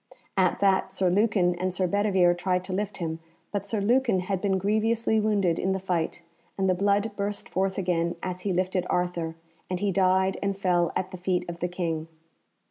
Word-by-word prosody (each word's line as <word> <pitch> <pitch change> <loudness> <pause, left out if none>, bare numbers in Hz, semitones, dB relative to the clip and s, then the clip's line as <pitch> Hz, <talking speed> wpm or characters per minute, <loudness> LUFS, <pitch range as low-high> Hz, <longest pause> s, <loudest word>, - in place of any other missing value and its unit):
At 185 -2 +2
that 190 -1 +3
Sir 190 -2 +1
Lucan 195 -3 +3
and 185 +1 -2
Sir 185 +1 0
Bedivere 190 -2 +3
tried 180 +1 -1
to 185 0 -5
lift 205 +2 -2
him, 165 -2 -3 0.3
but 200 -1 -3
Sir 215 0 -1
Lucan 230 -1 +2
had 185 0 -2
been 195 -2 +1
grievously 220 +3 +1
wounded 200 -6 +1
in 190 - +1
the 190 - -1
fight, 175 -2 -2 0.3
and 190 -1 +1
the 185 - +4
blood 200 +3 +1
burst 200 0 -3
forth 190 +1 -1
again 175 -2 0
as 180 -1 -4
he 200 - -1
lifted 185 0 0
Arthur, 175 -2 -1 0.3
and 180 -1 -2
he 205 0 +1
died 190 0 +2
and 200 -1 -1
fell 175 -3 +2
at 185 0 -2
the 185 - -6
feet 180 0 -1
of 170 0 -6
the 175 - 0
King. 165 -3 -3
185 Hz, 200 wpm, -27 LUFS, 180-200 Hz, 0.3 s, the